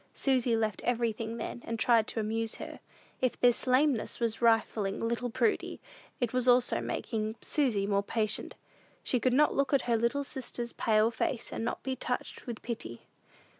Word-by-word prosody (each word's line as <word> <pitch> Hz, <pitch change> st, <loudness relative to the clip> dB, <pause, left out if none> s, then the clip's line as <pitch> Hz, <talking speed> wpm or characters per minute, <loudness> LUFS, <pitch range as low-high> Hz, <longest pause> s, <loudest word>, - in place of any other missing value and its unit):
Susy 255 Hz, -3 st, +2 dB
left 215 Hz, -3 st, -1 dB
everything 230 Hz, -1 st, -1 dB
then, 235 Hz, -, -5 dB
and 230 Hz, -, -3 dB
tried 225 Hz, -1 st, +4 dB
to -, -, -3 dB
amuse 220 Hz, +1 st, -1 dB
her. -, -, -8 dB, 0.4 s
If 255 Hz, -2 st, 0 dB
this 245 Hz, +1 st, +3 dB
lameness 255 Hz, -2 st, +2 dB
was 230 Hz, -1 st, -1 dB
refining 225 Hz, -2 st, +2 dB
little 235 Hz, +1 st, -1 dB
Prudy, 410 Hz, -, 0 dB, 0.4 s
it 245 Hz, -2 st, -1 dB
was 255 Hz, 0 st, +1 dB
also 245 Hz, 0 st, +4 dB
making 220 Hz, -2 st, -3 dB
Susy 240 Hz, -10 st, +1 dB
more 200 Hz, 0 st, +2 dB
patient. 215 Hz, +1 st, -2 dB, 0.5 s
She 250 Hz, -, +1 dB
could 255 Hz, -, +2 dB
not 295 Hz, +4 st, +4 dB
look 275 Hz, 0 st, 0 dB
at 275 Hz, -, +4 dB
her 235 Hz, -2 st, +2 dB
little 235 Hz, +5 st, +1 dB
sister's 245 Hz, -3 st, -4 dB
pale 220 Hz, +1 st, +3 dB
face, 235 Hz, +1 st, -2 dB
and -, -, -3 dB
not 235 Hz, -, -3 dB
be 265 Hz, -1 st, -2 dB
touched 250 Hz, +1 st, -4 dB
with 235 Hz, -2 st, -6 dB
pity. 220 Hz, -, -5 dB
235 Hz, 170 wpm, -30 LUFS, 220-255 Hz, 0.5 s, tried